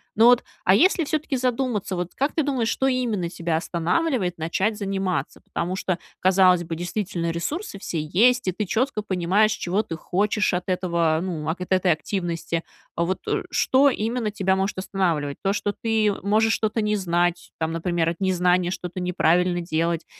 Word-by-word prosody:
Но 225 - +5
вот, 245 0 +6 0.2
а 185 - +5
если 340 - +4
всё-таки 295 -3 -1
задуматься, 245 -6 -1
вот, 180 0 -4
как 280 +3 -1
ты 315 - +2
думаешь, 260 -5 0
что 265 - 0
именно 235 -9 0
тебя 170 -2 -2
останавливает 180 - 0
начать 190 +7 -1
заниматься? 195 -3 -2
Потому 175 +2 -3
что, 185 -2 -1 0.2
казалось 185 -1 +4
бы, 165 0 -5
действительно 175 -1 -3
ресурсы 200 - -4
все 165 - -3
есть, 225 +10 +3
и - - +3
ты 210 +4 -3
четко 230 +3 0
понимаешь, 195 +2 +2
чего 195 +1 -1
ты 185 -6 -6
хочешь 205 +4 0
от 180 +1 -2
этого, 170 -3 +1
ну, 160 -4 -3
акэт 180 +3 -4
этой 185 -1 +3
активности. 170 -1 -2 0.3
Вот, 170 +3 -2
э, - - 0
что 275 +2 +4
именно 230 -2 -1
тебя 190 -2 0
может 190 +1 -1
останавливать? 170 -7 -1
То, 195 - +1
что 205 0 -1
ты 220 -2 +1
можешь 220 +3 +2
что-то 220 0 0
не 210 0 +1
знать, 175 -2 0
там, 160 0 -1
например, 165 0 -1
от 170 - -5
незнания 180 -2 +2
что-то 180 0 -5
неправильно 180 0 +2
делать 165 0 -1
185 Hz, 170 wpm, -24 LUFS, 175-215 Hz, 0.3 s, вот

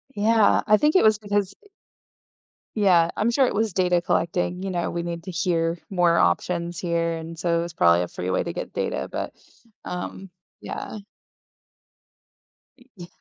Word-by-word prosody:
Yeah, 215 +1 +4
I 215 - +6
think 300 - +2
it 375 - +6
was 215 -1 +5
because, 205 -2 -2
eh - - -19 1.1
Yeah, 180 -6 +4
I'm 220 +3 +1
sure 265 +3 +3
it - - -1
was 215 -1 0
data 180 -1 +2
collecting. 175 +1 -1
You 195 - -3
know, 175 -2 -2
we 170 - -3
need 170 -1 -5
to 185 - -7
hear 170 -1 0
more 175 -3 +3
options 170 - 0
here, 170 -1 0
and 165 +1 -8
so, 170 0 0
it - - 0
was 170 -1 -7
probably 85 - +4
a - - -4
free 90 +1 -5
way - - +1
to - - -5
get - - -6
data, 65 - -2
but, - - -4 0.5
um, 185 +2 -6 0.3
yeah. 215 - -6 1.8
Y 250 +1 -22
Yeah. 175 -3 -10
175 Hz, 175 wpm, -24 LUFS, 170-205 Hz, 1.8 s, I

